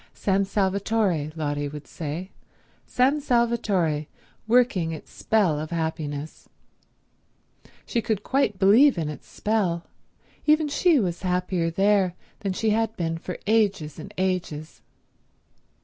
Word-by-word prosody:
San 195 0 +1
Salvatore, 195 -5 0
Lotty 145 -2 -2
would 150 0 -8
say, 165 +4 -6 0.6
San 270 +4 +2
Salvatore 215 - +1 0.4
working 225 -8 +3
its 155 - -10
spell 190 -9 +1
of 155 +1 -5
happiness. 155 -3 -4 1.4
She 235 - -1
could 210 -2 -2
quite 265 -7 +1
believe 215 +7 +6
in 160 -3 -1
its 150 - -9
spell. 190 -6 -1 0.6
Even 305 0 +4
she 310 +1 +3
was 175 -5 -2
happier 180 -2 0
there 195 0 +2 0.2
than 195 -2 -2
she 220 +3 0
had 225 +1 0
been 165 -1 -2
for 180 +1 -6
ages 200 -8 +1
and 195 +6 -8
ages. 180 -5 -2
190 Hz, 120 wpm, -25 LUFS, 160-220 Hz, 1.4 s, believe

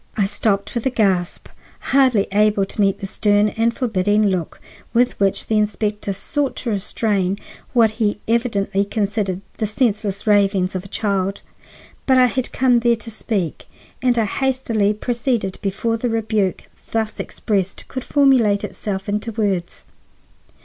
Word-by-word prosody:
I 205 - +3
stopped 200 0 -1
with 235 +2 -1
a - - +3
gasp, 195 -7 0 0.4
hardly 260 -7 +4
able 210 -1 +3
to 205 - -3
meet 195 -1 +2
the - - -3
stern 205 +1 +2
and 225 +2 +1
forbidding 210 -4 +1
look 180 -4 -3 0.4
with 245 +1 +4
which 195 -1 +1
the 215 -1 +1
inspector 210 0 -1
sought 275 - -2
to 235 - -3
restrain 200 -1 0 0.4
what 230 -3 +5
he 210 -1 +1
evidently 210 -4 +1
considered 200 -2 -2 0.2
the 215 - 0
senseless 210 -3 -1
ravings 200 -3 +3
of 185 -1 -3
a - - -10
child. 195 -1 -1 0.6
But 260 -1 +5
I 255 - +7
had 250 +1 -1
come 250 -2 +3
there 235 0 +3
to 230 0 -9
speak, 200 -7 -3 0.3
and 250 -2 +2
I 225 - +3
hastily 225 -4 0
proceeded 235 -3 -1
before 210 +4 -1
the 240 +2 -1
rebuke 220 -4 0 0.3
thus 220 -1 -2
expressed 195 -3 -2
could 260 - -5
formulate 255 -8 +3
itself 195 -1 -4
into 210 +3 -2
words. 200 -5 -2
210 Hz, 150 wpm, -20 LUFS, 195-235 Hz, 0.6 s, I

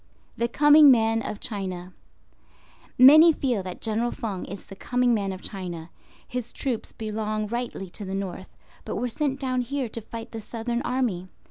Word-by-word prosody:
THE 235 - 0
COMING 295 +4 +7
MAN 225 -2 +4
OF 210 -2 -5
CHINA. 185 -4 -5 1.0
Many 310 +6 +9
feel 255 -8 -1
that 185 -1 -8
General 225 +2 0
Feng 205 -6 -4
is 195 +2 -8
the 195 - -11
coming 250 +3 +1
man 200 -3 0
of 185 0 -8
China. 175 -4 -6 0.4
His 245 -2 -5
troops 255 -6 -3
belong 215 -1 -3
rightly 235 -3 -4
to 210 - -8
the 190 0 -4
north, 190 -1 -5 0.3
but - - -5
were 250 - -1
sent 275 +2 -2
down 255 -2 0
here 265 +1 -2
to 230 - -5
fight 225 +1 -8
the 225 - -6
Southern 235 +2 -3
Army. 230 -9 -1
225 Hz, 170 wpm, -25 LUFS, 195-250 Hz, 1.0 s, Many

